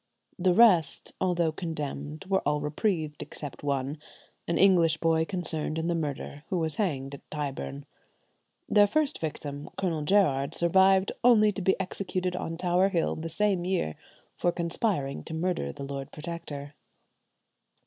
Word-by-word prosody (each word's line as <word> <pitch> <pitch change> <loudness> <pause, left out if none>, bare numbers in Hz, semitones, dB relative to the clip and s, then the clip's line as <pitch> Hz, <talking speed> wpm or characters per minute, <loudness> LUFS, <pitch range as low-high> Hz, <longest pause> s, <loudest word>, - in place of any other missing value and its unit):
The 180 0 +3
rest, 185 -11 +4
although 175 -3 +2
condemned, 155 0 -5
were 190 0 +1
all 150 +1 +1
reprieved, 155 0 -1
except 145 -2 -7
one, 140 +1 -2 0.5
an 170 - 0
English 170 -5 +5
boy 160 0 +2
concerned 160 -4 -1
in 160 - -1
the - - +2
murder, 145 -2 -4
who 185 - 0
was 160 -3 -1
hanged 140 -9 -1
at 140 - -11
Tyburn. 140 -1 -4 0.8
Their 205 -1 +5
first 300 +6 0
victim, 145 -2 -5
Colonel 170 -5 -1
Gerard, 150 -5 +2
survived 190 +2 +4
only 215 -3 +6
to 200 - -5
be 190 +2 +2
executed 185 -1 -2
on 165 -2 -4
Tower 180 +2 +2
Hill 175 -4 0
the 165 +1 -5
same 195 +1 +1
year 180 - -1 0.4
for 175 - +1
conspiring 170 -4 -1
to 160 - -5
murder 165 - -1
the 140 - -8
Lord 135 -1 -6
Protector. 150 -3 -7
165 Hz, 150 wpm, -28 LUFS, 145-185 Hz, 0.8 s, only